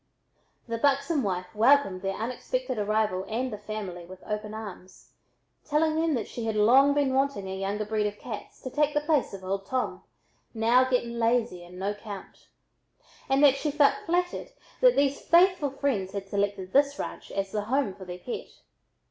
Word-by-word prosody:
The 230 -1 -3
buxom 280 +3 +2
wife 185 -4 -3
welcomed 220 -4 +4
their 195 0 -2
unexpected 255 - -3
arrival 210 -3 0
and 245 +2 -2
the - - -4
"family" 205 -4 -6
with 185 +2 -12
open 210 0 -4
arms, 200 -4 -10 0.5
telling 310 +1 +1
them 320 -1 +1
that 230 - -2
she 235 - -5
had 220 - -1
long 265 +7 +5
been 280 -2 +2
wanting 270 -7 0
a 190 - -4
younger 200 +2 -2
breed 210 0 0
of 205 0 -6
cats 215 -4 -8
to 260 - -5
take 300 +1 +1
the 295 - +3
place 295 -2 +1
of 195 -1 -9
"old 195 +1 -3
Tom," 255 +2 -2 0.5
now 240 +3 +4
getting 235 -2 0
lazy 230 -5 +1
and 175 +1 -12
"no 195 +2 -1
'count," 205 -1 -10 0.8
and 270 +2 +3
that 280 -2 +7
she 300 - -1
felt 290 -1 +4
flattered 355 +6 0 0.3
that - - +6
these 280 0 +2
faithful 345 -3 +4
friends 260 -9 -2
had 200 -1 -5
selected 200 -1 -2
this 280 +1 +4
ranch - - -6
as 195 -1 -2
the 210 0 -2
home 255 -3 0
for 190 - -11
their 180 0 -7
pet. 235 +7 -6
225 Hz, 180 wpm, -27 LUFS, 200-280 Hz, 0.8 s, that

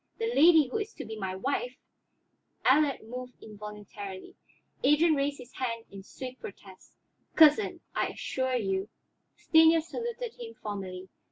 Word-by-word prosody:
The 455 +1 -1
lady 320 -2 +6
who 255 - -2
is 430 +1 -5
to 280 - -7
be 220 - -6
my 190 -3 -4
wife 250 +3 -2 0.5
" - - -42
Allard 280 +1 +4
moved 250 +1 -7
involuntarily; 205 -2 -9 0.5
Adrian 300 +4 +5
raised 285 0 0
his 250 -1 -13
hand 230 -3 -3
in 195 -1 -9
swift 255 +6 -9
protest. 195 -1 -12 0.4
"Cousin, 315 +5 +5
I - - +1
assure 260 -1 -2
you 195 -3 -1 0.3
" - - -49
Stanief 320 0 +6
saluted 470 +5 -5
him 460 -1 -8
formally. 190 -3 -6
255 Hz, 150 wpm, -29 LUFS, 210-315 Hz, 0.5 s, lady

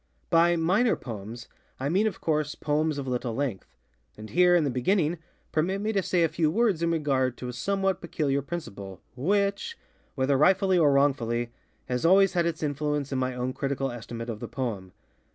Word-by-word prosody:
By 170 +1 +5
ŌĆ£minor 190 +9 +2
poemsŌĆØ 115 0 -8 0.3
I 135 +2 -1
mean, 195 +7 +2
of 205 - -4
course, 155 -2 -1
poems 155 0 0
of 140 -1 -4
little 125 -2 -2
length. 130 -8 -4 0.4
And 110 0 -10
here, 180 0 +5
in 170 - +4
the 140 - 0
beginning, 160 +5 +1 0.3
permit 180 +5 0
me 215 +2 -1
to 195 - +2
say 175 -2 +1
a - - +4
few 160 0 0
words 205 -2 +1
in 170 - +1
regard 135 -6 0
to 125 - -6
a - - -5
somewhat 195 +8 -1
peculiar 145 -5 -1
principle, 100 - -7 0.2
which, 200 - 0 0.4
whether 135 0 +1
rightfully 190 +3 +4
or 150 -3 +5
wrongfully, 120 -4 +1 0.3
has 125 -1 -2
always 190 +2 +5
had 170 -2 +2
its 170 - -3
influence 150 -1 -1
in 135 - 0
my 130 0 -1
own 125 +1 -2
critical 135 -1 -2
estimate 115 0 -6
of 105 - -7
the 120 - -6
poem. 110 -6 -4
150 Hz, 190 wpm, -27 LUFS, 125-175 Hz, 0.4 s, By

